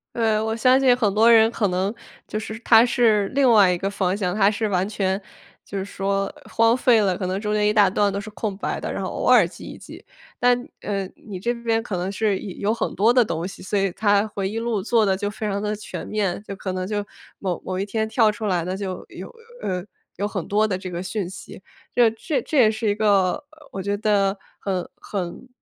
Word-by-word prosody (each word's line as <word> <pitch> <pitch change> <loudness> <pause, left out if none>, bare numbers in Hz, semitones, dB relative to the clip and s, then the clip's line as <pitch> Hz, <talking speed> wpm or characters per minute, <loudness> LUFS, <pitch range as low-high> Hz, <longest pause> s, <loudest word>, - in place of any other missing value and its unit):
呃， 220 -2 +1
我 220 0 -1
相 255 +3 +4
信 260 -2 +5
很 210 -5 +1
多 225 +3 +5
人 225 0 +6
可 215 -3 0
能 190 +3 -1 0.3
就 215 - -3
是 220 0 -6
他 230 -1 +6
是 220 -5 +3
另 270 -2 +3
外 205 -5 +6
一 180 - 0
个 195 +3 -2
方 190 -2 0
向， 185 -2 -1
他 200 -1 +4
是 215 +1 -1
完 190 -1 0
全 195 -2 -1 0.4
就 200 - -6
是 195 - -3
说 195 0 -2 0.2
荒 230 +1 +3
废 245 -3 +4
了， 195 -3 +2
可 185 0 -3
能 185 +1 -2
中 210 0 -2
间 210 0 +2
一 - - +3
大 210 -2 +5
段 200 0 +2
都 200 - -3
是 205 - -8
空 205 -2 -4
白 - - -3
的， - - -3
然 - - -3
后 - - -3
偶 - - -3
尔 - - +6
记 - - -12
一 - - -9
记。 - - -12 0.4
但 245 0 +4 0.2
呃， 200 -2 -2
你 195 -4 -9
这 235 +6 0
边 230 -1 -1
可 210 - -4
能 180 +2 -2
是 200 -1 0
有 200 0 -4
有 - - +2
很 - - -2
多 225 +4 +4
的 245 -1 +5
东 170 -2 -3
西， 195 - -10
所 205 +2 -2
以 195 -1 +1
它 205 +2 +2
回 195 -2 -3
忆 220 - -5
录 230 -3 -1
做 225 +2 +2
得 190 -1 +2
就 205 +1 -2
非 215 +1 -5
常 200 0 -2
地 210 0 -1
全 210 - -7
面， 200 -4 -1
就 200 -2 -7
可 190 0 -4
能 185 0 -3
就 205 -1 -2 0.3
某 185 -4 -3
某 185 0 -3
一 195 - -1
天 220 +1 -2
跳 220 -2 +4
出 215 0 -5
来 175 -3 0
的 185 +1 -2
就 190 -2 -5
有 - - -8 0.3
呃， 180 0 -3 0.3
有 200 +3 -2
很 190 -5 -4
多 210 +2 +2
的 200 - -1
这 185 0 -6
个 175 0 -4
讯 190 -1 -3
息。 190 - -11 0.3
这 240 -2 +5
这 280 +6 -2
这 305 - -3
也 225 -5 +6
是 220 0 -1
一 205 - +1
个， 200 -4 +3 0.2
呃， 310 -2 -19
我 195 - -6
觉 200 +1 0
得 200 -2 +2 0.2
很 185 -3 -3
很 195 +5 -5
205 Hz, 265 characters per minute, -23 LUFS, 195-220 Hz, 0.4 s, 人